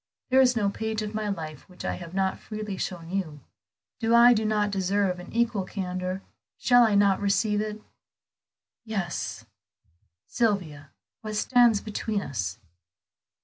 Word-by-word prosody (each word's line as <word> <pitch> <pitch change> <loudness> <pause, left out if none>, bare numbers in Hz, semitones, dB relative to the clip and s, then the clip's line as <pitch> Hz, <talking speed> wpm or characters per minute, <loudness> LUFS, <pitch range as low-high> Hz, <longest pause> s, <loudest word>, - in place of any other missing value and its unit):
There 265 +1 +6
is 250 -1 +4
no 210 -3 +1
page 220 +1 -2
of 210 0 -5
my 215 -1 -2
life 155 -4 -6
which 180 - -10
I - - 0
have 175 0 -8
not 190 -1 0
freely 215 -2 -5
shown 175 -2 -5
you; 165 -7 -3 0.6
do 230 0 +3
I 240 +1 +8
do 220 -1 0
not 210 -1 +1
deserve 195 -1 0
an 180 - -10
equal 230 -4 +1
candor? 185 0 -4 0.3
Shall 245 -1 +5
I 220 -3 +4
not 200 -1 +4
receive 205 +1 +1
it?" 215 0 -5 1.0
"Yes." 200 -7 -4 0.8
"Sylvia, 175 -11 -1 0.3
what 215 -1 -5
stands 240 -1 +4
between 215 -1 -3
us?" 95 -8 -3
205 Hz, 145 wpm, -26 LUFS, 185-220 Hz, 1.0 s, I